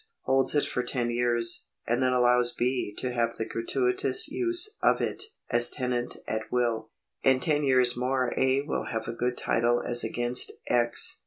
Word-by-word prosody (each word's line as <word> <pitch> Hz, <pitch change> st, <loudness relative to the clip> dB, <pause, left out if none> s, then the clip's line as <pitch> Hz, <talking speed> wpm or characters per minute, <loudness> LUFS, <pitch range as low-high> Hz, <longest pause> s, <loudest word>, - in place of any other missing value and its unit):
holds 135 Hz, +2 st, +1 dB
it 145 Hz, -, +2 dB
for 125 Hz, -, -2 dB
ton 120 Hz, -2 st, -1 dB
years, 120 Hz, -1 st, +1 dB, 0.2 s
and 120 Hz, +2 st, 0 dB
then 130 Hz, 0 st, +2 dB
allows 125 Hz, -1 st, +3 dB
B. 125 Hz, -3 st, -1 dB
to 125 Hz, -, -2 dB
have 115 Hz, -1 st, -1 dB
the 110 Hz, -, -3 dB
gratuitous 125 Hz, -, 0 dB
use 355 Hz, +5 st, +4 dB
of -, -, +3 dB
it 405 Hz, -, -2 dB, 0.3 s
as 120 Hz, 0 st, +3 dB
tenant 125 Hz, -1 st, -2 dB
at 110 Hz, 0 st, -4 dB
will. 115 Hz, -3 st, -1 dB, 0.3 s
In 130 Hz, -1 st, +3 dB
ten 150 Hz, +3 st, 0 dB
years 130 Hz, -3 st, +3 dB
more 125 Hz, 0 st, -1 dB
A. 130 Hz, +1 st, +2 dB
will 150 Hz, -, -3 dB
have 110 Hz, -1 st, -4 dB
a -, -, -4 dB
good 125 Hz, +1 st, -2 dB
title 120 Hz, +1 st, +1 dB
as 120 Hz, 0 st, 0 dB
against 120 Hz, +1 st, -1 dB
X. 120 Hz, -1 st, 0 dB
125 Hz, 175 wpm, -27 LUFS, 120-130 Hz, 0.3 s, use